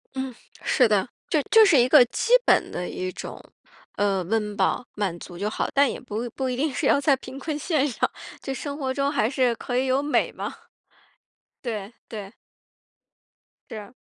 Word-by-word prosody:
嗯， 265 -1 -3 0.3
是 250 -5 +4
的。 210 +1 +2 0.2
就 305 - +2
就 445 -1 +8
是 335 -8 +5
一 245 +1 +4
个 285 -4 +9
基 465 - -3
本 - - +3
的 180 0 -4
一 185 0 -4
种， - - -8 0.6
嗯， 195 -3 +1
温 210 -2 0
饱 245 - +1
满 195 -5 -1
足 175 -2 -10
就 205 +3 -1
好， - - -1
但 280 -1 +4
也 - - -6
不 235 +1 -4
不 265 -1 -3
一 250 - -1
定 280 +1 0
是 - - -2
要 280 - +4
在 280 -1 +4
贫 260 +1 -9
困 295 +2 -3
线 300 -4 +1
上， 245 - 0 0.3
就 270 - -4
生 285 +1 -5
活 260 -3 -2
中 280 +1 0
还 225 - +1
是 255 -3 +2
可 245 +1 -3
以 260 +1 +1
有 265 +2 +2
美 295 - +1
嘛。 - - -5 1.1
对， 215 -3 -4 0.2
对。 210 -2 -7 1.4
是 220 - -6
啊。 205 +4 -12
250 Hz, 205 characters per minute, -25 LUFS, 210-280 Hz, 1.4 s, 个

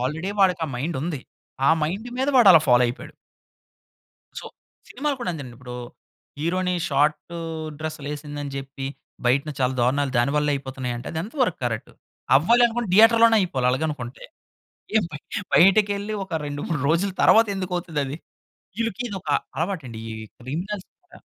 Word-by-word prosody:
Already 155 +9 -2
వాడికి 180 -3 +4
ఆ - - -6
mind 155 +5 -2
ఉంది. 160 -5 -3 0.5
ఆ - - +7
మైండ్ 195 +10 -2
మీద 265 +2 +1
వాడు 235 -6 +7
అలా 160 - +8
ఫాలో 125 0 +6
అయిపోయాడు... 120 - -6 1.3
సో, - - -9 0.4
సినిమాలు 290 -1 -2
కూడా 210 - -1
అంతేనండి. 130 -7 -8
ఇప్పుడు 125 -1 -8 0.6
హీరోయిని 180 +2 0
షార్ట్ 150 +4 +1 0.5
డ్రెస్‌లు 155 -2 -5
వేసిందని 145 -1 -6
చెప్పి, 135 0 -6 0.4
బయటన 140 +5 +2
చాలా 130 0 +2
దారుణాలు 135 +2 +1
దానివల్లే 145 +4 +2
అయిపోతున్నాయి 130 -2 -4
అంటే, 120 - -8
అది 160 - -3
ఎంత 220 - -9
వరకు 185 - 0
కరెక్ట్? 115 -2 -3 0.5
అవ్వాలనుకుంటే 235 - +3
థియేటర్‌లోనే 225 +1 +7
అయిపోవాలి 135 -9 0
అలాగ 130 +4 -1
అనుకుంటే. 125 -4 -6 0.7
ఏం 220 - +4
బ - - -11 0.4
బయటికెళ్ళి 205 +2 +4
ఒక 190 - -9
2,3 145 +2 -3
రోజుల 170 +5 +2
తర్వాత 225 0 +6
ఎందుకు 185 -1 -4
అవుతది 165 -4 -4
అది? 135 - -5 0.6
వీళ్ళకి 230 +1 -2
ఇదొక 190 -6 -7 0.3
అలవాటు 170 -1 -2
అండి 115 - -8
ఈ - - -4 0.3
క్రిమినల్స్ 180 - -5
కదా! 360 - -17
160 Hz, 150 wpm, -24 LUFS, 135-200 Hz, 1.3 s, అలా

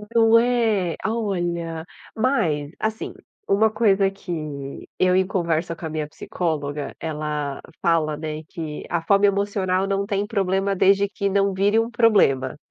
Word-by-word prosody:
Não 225 0 +6
é? 225 -8 +1
A 220 - 0
olha. 170 -6 -2 0.3
Mas, 175 - 0
assim, 220 0 -3 0.3
uma 220 +2 +4
coisa 200 -3 +3
que 155 -8 -6
eu 185 0 +4
em 190 0 +3
conversa 170 -3 -1
com 165 - -8
a - - -3
minha 155 -1 -3
psicóloga, 150 -3 -3
ela 150 -3 -3 0.2
fala, 155 -3 +1
né, 155 0 -5
que 155 -3 -6
a 170 -1 0
fome 200 +4 +4
emocional 195 -2 0
não 195 0 0
tem 200 -1 -1
problema 195 -1 0
desde 195 +2 +4
que 200 -1 -2
não 200 0 +2
vire 205 +4 +3
um 230 - 0
problema. 195 - +3
185 Hz, 150 wpm, -23 LUFS, 160-200 Hz, 0.3 s, Não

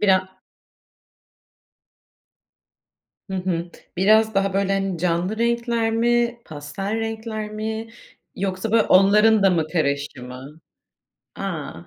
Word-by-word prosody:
Bira 190 -2 +2 3.0
Hı 190 - -3
hı. 175 -2 -2 0.3
Biraz 220 +3 +4
daha 195 0 +1
böyle, 195 0 +1
hani, 195 -2 -1
canlı 180 +4 -1
renkler 235 -1 0
mi, 240 +1 +1
pastel 155 +8 -5
renkler 220 -1 -4
mi 220 +1 -4 0.5
yoksa 190 +2 -3
böyle 225 -1 +5
onların 210 +2 +5
da 195 - +6
mı 165 -4 +1
karışımı? 140 -2 -3 0.8
A, - - -4
195 Hz, 100 wpm, -22 LUFS, 180-220 Hz, 3.0 s, da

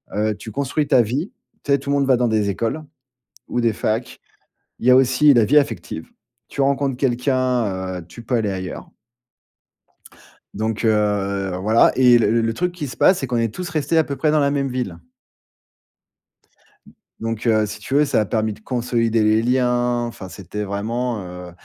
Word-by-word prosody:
heu, 105 +1 0
tu 110 +2 -9
construis 140 +5 -1
ta 125 - +5
vie, 130 - -2 0.3
tu 145 - -3
sais, 140 - +4
tout 140 - -8
le - - +2
monde 140 -1 +1
va 130 -2 +4
dans 120 0 +1
des 110 -2 +1
écoles, 115 +10 -2 0.7
ou 120 - -1
des 115 -2 +2
facs. 110 +3 -3 0.6
Il 120 - -2
y - - +7
a - - +7
aussi 130 +3 +5
la 115 -2 +5
vie 150 - +4
affective. 100 - -5 0.4
Tu 140 - -4
rencontres 135 -1 +1
quelqu'un, 125 -8 0
heu, 85 - -11
tu 120 +7 -12
peux 125 +2 -1
aller 110 -3 0
ailleurs. 95 -2 -6 1.6
Donc, 110 +2 -2
heu, 100 -3 0
voilà. 110 +4 +4
Et, 125 -2 +6
le 115 0 +2
le 115 0 -1
truc 180 +7 -1
qui 170 -5 -6
se 125 - -8
passe, 185 - +4
c'est 135 - -3
qu'on 120 0 -1
est 115 -2 -1
tous 180 - -5
restés 155 0 0
à 160 - +5
peu 140 - -5
près 150 +2 +1
dans 155 - +3
la 140 -1 +2
même 140 -1 -1
ville. 125 -1 -4 1.9
D - - -17 0.3
donc, 115 +1 -3
heu, 110 -1 +3
si 105 +1 -7
tu 105 - -7
veux 150 +1 +5
ça - - +1
a - - -1
permis 110 +1 -1
de - - -16
consolider 115 -1 0
les 110 +1 +3
liens, 120 0 +1
enfin 115 -5 -8
c'était 100 +3 -6
vraiment, 110 +3 -3
heu, 90 0 -9
120 Hz, 195 wpm, -21 LUFS, 105-135 Hz, 1.9 s, y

